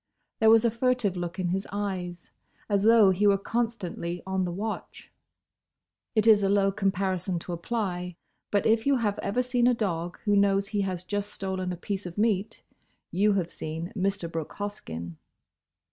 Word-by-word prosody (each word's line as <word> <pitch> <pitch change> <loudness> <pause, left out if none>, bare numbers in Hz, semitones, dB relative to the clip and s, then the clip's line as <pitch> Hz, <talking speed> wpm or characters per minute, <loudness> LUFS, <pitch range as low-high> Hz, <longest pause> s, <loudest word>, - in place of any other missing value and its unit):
There 220 - +5
was 225 +1 +6
a 230 - +3
furtive 235 -4 +1
look 175 0 -4
in 185 -2 -1
his 190 +2 -2
eyes, 185 -4 -4 0.4
as 200 -2 +2
though 220 -2 +6
he 200 +3 +2
were 200 -1 +5
constantly 200 -6 -3
on 190 -1 0
the 175 - -3
watch. 210 +5 -5 1.0
It 215 -1 +3
is 215 -2 +7
a 195 - +2
low 200 0 +3
comparison 190 -2 -1
to 175 +1 -5
apply, 180 -2 -3 0.3
but 205 - +1
if 225 +3 +3
you 280 - +5
have 210 -5 0
ever 250 +5 0
seen 245 -1 +2
a 250 - +4
dog 175 -6 -2
who 205 -1 +2
knows 200 0 +3
he 205 -2 0
has 185 -2 -3
just 205 +2 -3
stolen 190 -2 -3
a 180 - -4
piece 195 +1 -4
of 175 - -9
meat, 210 -2 0 0.5
you 205 +4 +3
have 180 -3 -1
seen 165 +4 -5
Mr. 195 -2 -1
Brooke 160 -2 -4
Hoskyn. 85 - -6
195 Hz, 175 wpm, -27 LUFS, 180-215 Hz, 1.0 s, is